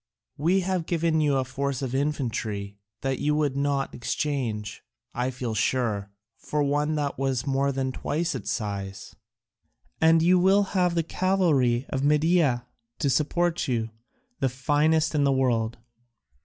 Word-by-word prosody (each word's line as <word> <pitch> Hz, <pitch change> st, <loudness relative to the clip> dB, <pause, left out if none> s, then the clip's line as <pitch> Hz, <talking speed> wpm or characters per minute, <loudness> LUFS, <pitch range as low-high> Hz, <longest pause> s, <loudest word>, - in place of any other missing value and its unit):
We 175 Hz, +6 st, +2 dB
have 180 Hz, -2 st, -2 dB
given 165 Hz, -2 st, +1 dB
you 145 Hz, -2 st, +2 dB
a 130 Hz, -, 0 dB
force 135 Hz, 0 st, -3 dB
of 130 Hz, -2 st, -3 dB
infantry 115 Hz, -8 st, -2 dB, 0.2 s
that 135 Hz, -1 st, -1 dB
you 150 Hz, +1 st, +1 dB
would 145 Hz, -3 st, 0 dB
not 140 Hz, -1 st, 0 dB
exchange, 120 Hz, -5 st, -3 dB, 0.3 s
I 125 Hz, +1 st, -1 dB
feel 125 Hz, -3 st, -4 dB
sure, 110 Hz, -3 st, 0 dB, 0.3 s
for 150 Hz, -1 st, -1 dB
one 145 Hz, +2 st, +1 dB
that 145 Hz, -3 st, -2 dB
was 135 Hz, -2 st, 0 dB
more 140 Hz, 0 st, +1 dB
than 130 Hz, -1 st, -2 dB
twice 160 Hz, +5 st, -2 dB
its 125 Hz, -6 st, -5 dB
size; 100 Hz, -3 st, -4 dB, 0.9 s
and 160 Hz, 0 st, +5 dB
you 180 Hz, +2 st, +5 dB
will 195 Hz, +3 st, +4 dB
have 180 Hz, -3 st, +2 dB
the 165 Hz, -, +2 dB
cavalry 155 Hz, -10 st, +1 dB
of 135 Hz, 0 st, -2 dB
Media 150 Hz, -4 st, +3 dB, 0.3 s
to 140 Hz, -, +1 dB
support 165 Hz, +4 st, +1 dB
you, 115 Hz, -3 st, -1 dB, 0.5 s
the 135 Hz, -, +1 dB
finest 150 Hz, +5 st, +1 dB
in 150 Hz, -2 st, +2 dB
the 140 Hz, -, +3 dB
world. 120 Hz, -3 st, +1 dB
140 Hz, 150 wpm, -26 LUFS, 125-155 Hz, 0.9 s, and